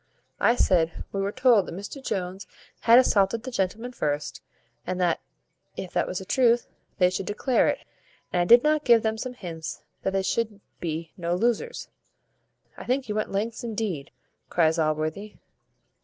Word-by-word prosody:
I 235 - +4
said, 170 -7 +2
we 195 - -2
were 200 +1 -1
told 245 -5 +4
that - - -6
Mr 205 +8 -8
Jones 190 -3 -3 0.3
had 230 +1 +6
assaulted 225 -2 +3
the 260 - -6
gentleman 225 +3 -2
first, 150 -10 -3 0.5
and 185 0 -2
that, 175 -2 +2 0.6
if 185 - -6
that - - +1
was 185 - -3
the 190 - -5
truth, 240 +1 +3 0.3
they 180 -1 +4
should 185 0 -3
declare 235 +4 +2
it; - - -1 0.5
and 175 - +3
I - - +2
did 240 +9 +7 0.2
give 235 -4 +5
them 220 0 -1
some 255 +1 -4
hints 165 -7 -7 0.2
that 190 - -1
they 195 0 +1
should 215 0 -1 0.2
be 165 -1 -4
no 175 -1 -1
losers." 240 - -1 0.9
"I - - -7
think 255 0 -1
you - - 0
went 215 0 -2
lengths 220 +5 -2
indeed," 210 -11 -3 0.4
cries 160 -1 +2
Allworthy. 155 +6 -1
200 Hz, 170 wpm, -26 LUFS, 175-235 Hz, 0.9 s, did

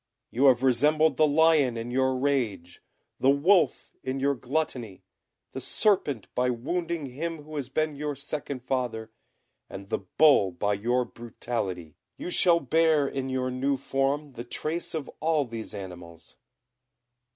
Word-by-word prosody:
You 130 +4 +2
have 130 -2 +5
resembled 150 +3 +3
the 155 - +5
lion 150 -5 +4
in 115 +1 -5
your 130 0 +1
rage, 115 -11 -1 0.4
the 135 - +3
wolf 170 +7 +3
in 130 +1 -3
your 140 +1 +2
gluttony, 125 - -3 0.5
the - - -6
serpent 165 - +1
by 125 0 +1
wounding 165 +6 -2
him 155 +4 -5
who 155 +1 -10
has 140 -4 -4
been 155 +2 -1
your 145 0 -3
second 140 -2 -5
father, 120 -4 -2 0.6
and 95 0 -9
the - - -1
bull 100 - +4
by 100 +4 0
your 120 +5 0
brutality. 105 -8 -5 0.2
You 180 - -5
shall 170 -2 +4
bear 155 0 +3
in 135 -1 -3
your 130 -1 -1
new 135 +2 0
form 135 +2 -1
the 120 - -7
trace 155 +8 -4
of 155 -3 -4
all 155 -2 +1
these 115 -2 -7
animals." 90 -5 -10
135 Hz, 150 wpm, -27 LUFS, 120-150 Hz, 0.6 s, have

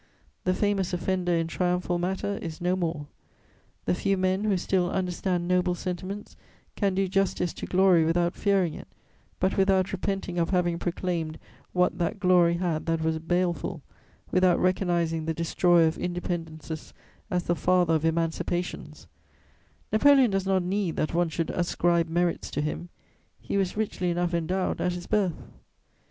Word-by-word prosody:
The 185 0 +2
famous 200 -3 0
offender 180 0 0
in 165 0 +1
triumphal 180 +1 -1
matter 190 +3 -2
is 160 -3 -6
no 180 +1 +1
more; 165 -5 -2 0.8
the - - +2
few 195 +2 0
men 185 +2 +1
who 205 -3 +2
still 180 0 +1
understand 180 -1 -1
noble 180 0 +2
sentiments 185 +3 -5 0.4
can 195 -3 0
do 195 0 +1
justice 190 -2 0
to - - -7
glory 185 -3 +4
without 170 +2 +1
fearing 195 -5 +1
it, - - -9 0.5
but 185 +1 +1
without 190 -1 +3
repenting 195 -2 -2
of 170 - +1
having 175 -2 +1
proclaimed 170 -3 -2 0.3
what 180 0 +1
that 175 +5 -1
glory 180 -3 +4
had 170 -3 -2
that 165 -1 0
was 160 0 0
baleful, 170 -2 -1 0.5
without 185 -1 +4
recognising 170 -3 +1
the 160 0 -2
destroyer 170 +1 +3
of 160 - 0
independences 165 -3 -4 0.4
as 180 -3 0
the 175 - +1
father 180 -1 +2
of 160 -1 +1
emancipations: 165 +2 -2 0.9
Napoleon 265 +1 +6
does 195 0 -1
not 190 -1 +2
need 185 -1 -1
that 155 - -1
one 175 0 +2
should 165 0 -2
ascribe 170 -1 +1
merits 175 +1 0
to 145 - -2
him; 155 +3 -4 0.5
he - - -4
was 195 0 0
richly 200 -4 -1
enough 175 0 0
endowed 180 +3 -1
at 180 - +1
his 175 0 -6
birth. 195 -6 0
180 Hz, 155 wpm, -27 LUFS, 170-185 Hz, 0.9 s, Napoleon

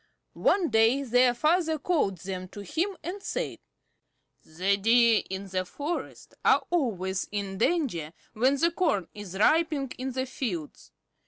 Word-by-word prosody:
One 370 -4 +2
day 225 +4 +3
their 245 -1 +3
father 320 +4 +2
called 285 - 0
them 185 +1 -6
to 205 - -10
him 345 - -2
and 380 +4 -5
said: - - -3 0.8
"The 185 +5 0
Deer 230 +2 +4
in 190 +1 -5
the 185 0 -1
forest 290 - -5
are - - +4
always 195 - -1
in 200 -2 -4
danger 225 - 0 0.2
when 255 +5 +3
the 335 +4 +2
corn 300 - 0
is 200 -3 -8
ripening 300 +2 +2
in 260 +1 -3
the 260 +1 -2
fields. 205 - -5
240 Hz, 145 wpm, -27 LUFS, 195-315 Hz, 0.8 s, Deer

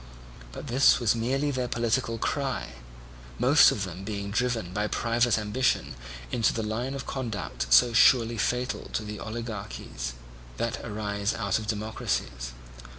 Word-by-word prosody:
But - - -8
this 135 0 +5
was 115 -4 +3
merely 135 +5 0
their 130 -2 -1
political 115 0 0
cry; 135 +2 -2 0.7
most - - +7
of - - -2
them 95 - -6
being 100 -1 -4
driven 115 -5 -1
by 105 +1 0
private 115 +1 +1
ambition 110 +4 0 0.4
into 115 -3 +2
the 110 - -2
line 120 +5 -2
of 135 - -5
conduct 105 - -4
so 115 - +7
surely 115 0 +5
fatal 125 +2 -1
to 105 -1 -3
oligarchies 110 - -5 0.4
that - - -2
arise 105 -1 -2
out 105 -3 0
of 110 - -7
democracies. 105 - -3
115 Hz, 140 wpm, -27 LUFS, 105-125 Hz, 0.7 s, most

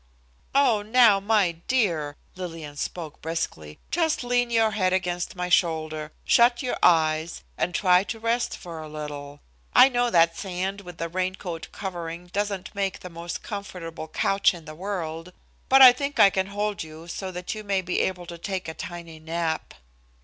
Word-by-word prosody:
"And 225 -7 +3
now 230 -5 +7
my 200 -3 +2 0.2
dear," 170 - +1 0.2
Lillian 165 -5 -7
spoke 155 +1 -5
briskly, 80 - -4
"just 325 -6 +1
lean 245 0 +1
your 225 -2 +3
head 185 -3 +1
against 180 -1 -1
my 180 -1 -2
shoulder, 155 -3 +1
shut 240 +2 +4
your 250 - -1
eyes, 160 -1 +3
and 180 - -1
try 180 -1 +4
to 225 - -5
rest 230 +2 0
for 165 -3 -8
a 155 - -8
little; 145 -1 -7 0.3
I 265 - +9
know 245 -1 +1
that 165 -4 +4
sand 190 +1 -3
with 175 -3 -11
a 165 - -2
rain 185 +2 -2
coat 170 -4 -6
covering 175 -2 -6
doesn't 200 -2 -2
make 195 -2 -2
the 180 - -8
most 170 0 -6
comfortable 180 -6 -6
couch 195 +4 +2
in 165 -2 -12
the 155 - -8
world, 170 -1 -5 0.4
but 270 0 +8
I 255 - +12
think 280 +3 -4
I 195 - +8
can 190 0 0
hold 205 0 -2
you 160 +1 -9
so 190 +2 -5
that 180 0 -4
you 215 -1 -7
may 195 -2 0
be 180 0 -1
able 180 -2 -1
to 170 0 -9
take 190 0 -4
a 160 - -4
tiny 170 -3 -8
nap." 160 0 -3
180 Hz, 180 wpm, -25 LUFS, 165-205 Hz, 0.4 s, I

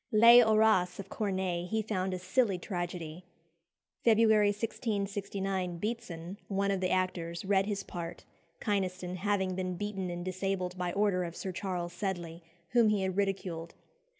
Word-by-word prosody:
"Les 230 +2 +9
Horaces" 215 -5 +4
of 195 -1 -7
Corneille 185 -4 -1
he 220 +3 0
found 190 -3 -1
"a 185 - -2
silly 195 +2 +1
tragedy." 175 -2 -5 0.8
February 220 -2 +5
1669 200 -4 -2
Beetson, 195 -3 -5
one 200 0 0
of 195 - 0
the 185 0 0
actors, 180 -2 -1
read 195 0 +3
his 200 -2 -2
part, 170 -3 -7 0.3
Kynaston 185 -3 -1
having 190 -1 0
been 185 0 -2
beaten 195 -1 -3
and 175 0 -5
disabled 185 -1 -2
by 180 -1 -2
order 195 -3 +2
of 170 -1 -5
Sir 190 - -4
Charles 180 -2 -3
Sedley, 175 -3 -4 0.3
whom 235 -3 +4
he 205 -2 +1
had 190 -1 -1
ridiculed. 185 -4 -2
190 Hz, 150 wpm, -31 LUFS, 180-205 Hz, 0.8 s, Les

